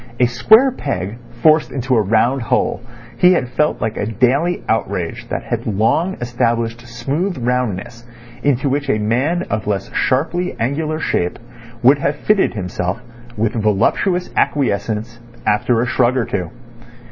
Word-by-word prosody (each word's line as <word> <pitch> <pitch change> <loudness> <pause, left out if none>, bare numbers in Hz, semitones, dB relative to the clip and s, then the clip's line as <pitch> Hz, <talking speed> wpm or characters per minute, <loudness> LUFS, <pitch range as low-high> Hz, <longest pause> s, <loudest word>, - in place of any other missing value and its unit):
A 125 - +5
square 215 - +5
peg 115 - -4 0.2
forced 155 0 +4
into 130 -1 0
a 110 - +4
round 115 +6 +2
hole, 115 - 0 0.4
he 180 +1 +6
had 125 -8 0
felt 150 +5 0
like 110 0 -2
a 105 - -2
daily 135 - +1
outrage 100 -6 -2
that - - -3
long 115 - +1
established 120 -1 -1
smooth 140 +10 -2
roundness 120 -3 -2 0.4
into 140 -1 +1
which 140 +1 -1
a 120 - +2
man 130 +12 0
of 105 -1 -2
less 100 -2 -2
sharply 165 +7 0
angular 155 +6 -1
shape 90 - -1 0.5
would 135 +4 +6
have 140 +1 0
fitted 200 - +1
himself, 90 -2 -3 0.4
with 110 0 0
voluptuous 115 - +1
acquiescence, 115 -3 -1 0.3
after 115 +2 +2
a - - +1
shrug 125 +1 +2
or 120 - +1
two. 90 -4 -3
120 Hz, 145 wpm, -18 LUFS, 110-145 Hz, 0.5 s, he